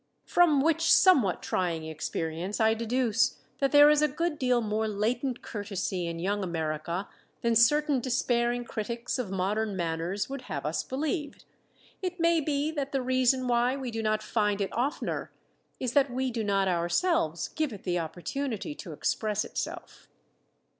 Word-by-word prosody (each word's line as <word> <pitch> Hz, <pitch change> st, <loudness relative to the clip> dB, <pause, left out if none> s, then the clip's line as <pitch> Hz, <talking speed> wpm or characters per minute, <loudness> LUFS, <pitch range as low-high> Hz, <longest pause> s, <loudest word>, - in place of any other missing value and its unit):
From 320 Hz, -6 st, +4 dB
which 330 Hz, +2 st, +2 dB
somewhat 265 Hz, -, +5 dB
trying 170 Hz, -3 st, -1 dB
experience 160 Hz, +4 st, -4 dB
I 220 Hz, 0 st, +4 dB
deduce 230 Hz, 0 st, +1 dB, 0.2 s
that 275 Hz, -1 st, +1 dB
there 290 Hz, 0 st, +8 dB
is 300 Hz, 0 st, +5 dB
a 300 Hz, -, +4 dB
good 315 Hz, +2 st, -2 dB
deal 250 Hz, -2 st, +2 dB
more 220 Hz, -1 st, -1 dB
latent 235 Hz, +5 st, -1 dB
courtesy 195 Hz, -4 st, -3 dB
in 170 Hz, 0 st, -4 dB
Young 200 Hz, +4 st, -1 dB
America 170 Hz, +2 st, -3 dB, 0.4 s
than 235 Hz, 0 st, +2 dB
certain 290 Hz, +4 st, +4 dB
despairing 245 Hz, -1 st, 0 dB
critics 235 Hz, +3 st, -3 dB
of 240 Hz, -6 st, -3 dB
modern 200 Hz, +3 st, -1 dB
manners 170 Hz, +3 st, -2 dB
would 275 Hz, -1 st, -6 dB
have 140 Hz, -2 st, -4 dB
us 155 Hz, +2 st, 0 dB
believe. 295 Hz, +2 st, -3 dB, 0.6 s
It 365 Hz, -1 st, -3 dB
may 335 Hz, -1 st, +3 dB
be 290 Hz, +1 st, 0 dB
that 280 Hz, -3 st, -4 dB
the 270 Hz, -, +1 dB
reason 255 Hz, 0 st, +2 dB
why 245 Hz, +1 st, +2 dB
we 260 Hz, -3 st, -4 dB
do 225 Hz, 0 st, -3 dB
not 215 Hz, -1 st, 0 dB
find 210 Hz, -2 st, 0 dB
it 200 Hz, -, -2 dB
oftener 265 Hz, +7 st, -2 dB, 0.5 s
is 250 Hz, -2 st, -2 dB
that 280 Hz, -1 st, +4 dB
we 260 Hz, +1 st, -1 dB
do 230 Hz, -2 st, -2 dB
not 195 Hz, -2 st, +1 dB
ourselves 175 Hz, -, +1 dB
give 310 Hz, -3 st, -2 dB
it 205 Hz, -, -9 dB
the 175 Hz, -1 st, 0 dB
opportunity 220 Hz, -, -4 dB
to 180 Hz, -, -9 dB
express 210 Hz, +6 st, -1 dB
itself. -, -, -6 dB
235 Hz, 160 wpm, -28 LUFS, 195-275 Hz, 0.6 s, there